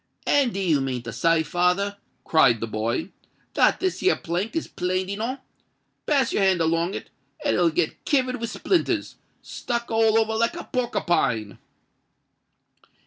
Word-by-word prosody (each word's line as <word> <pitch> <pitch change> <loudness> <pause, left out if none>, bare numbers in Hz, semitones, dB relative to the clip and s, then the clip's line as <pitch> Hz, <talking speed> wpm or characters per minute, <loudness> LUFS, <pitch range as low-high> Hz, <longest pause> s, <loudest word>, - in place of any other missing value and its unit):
"And 280 -4 +3
do 195 - -4
you 165 -7 +2
mean 130 -3 -3
to 115 - -7
say, 165 +5 +2
father," 180 +4 0 0.3
cried 125 -8 +4
the 115 - -2
boy, 115 - -2 0.4
"that - - +3
this 375 -1 -1
here 385 - +3
plank 180 - -3
is 325 - -2
planed 185 +1 -2
enow? 230 +7 -3 0.7
Pass 275 -4 +2
your - - +1
hand 190 -2 +3
along 165 +3 +1
it, - - -8 0.3
and - - +2
it'll 175 -1 +3
get 160 0 -2
kivered 255 -3 +1
with 230 - -2
splinters—stuck 240 -8 -3
all 225 0 +3
over 220 0 0
like 230 +1 +1
a - - -6
porkipine." 135 - -1
185 Hz, 150 wpm, -24 LUFS, 160-230 Hz, 0.7 s, cried